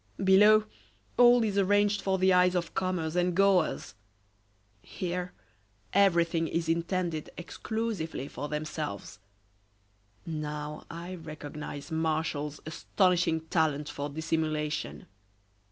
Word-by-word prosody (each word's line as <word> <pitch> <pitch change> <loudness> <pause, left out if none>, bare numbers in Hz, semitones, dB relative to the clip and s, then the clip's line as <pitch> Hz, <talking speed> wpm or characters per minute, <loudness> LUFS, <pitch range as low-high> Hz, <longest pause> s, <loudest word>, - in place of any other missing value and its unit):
Below, 210 +3 +6 0.5
all 245 -1 +6
is 205 -2 0
arranged 205 +1 +3
for 190 -1 +1
the 190 0 +4
eyes 180 0 +4
of 175 -2 -2
comers 185 -4 -1
and 180 0 +1
goers. 195 -3 +2 0.9
Here, 180 - -4 0.6
everything 170 -4 +3
is 170 0 -2
intended 170 -1 -1
exclusively 185 - -4
for 145 +3 -6
themselves. 150 -9 -5 1.1
Now, 150 -2 -5
I 170 +2 -7
recognize 150 -3 -8
Martial's 155 -2 -1
astonishing 170 +1 +1
talent 155 -3 0
for 145 +1 -4
dissimulation. 155 - -2
165 Hz, 100 wpm, -29 LUFS, 155-185 Hz, 1.1 s, Below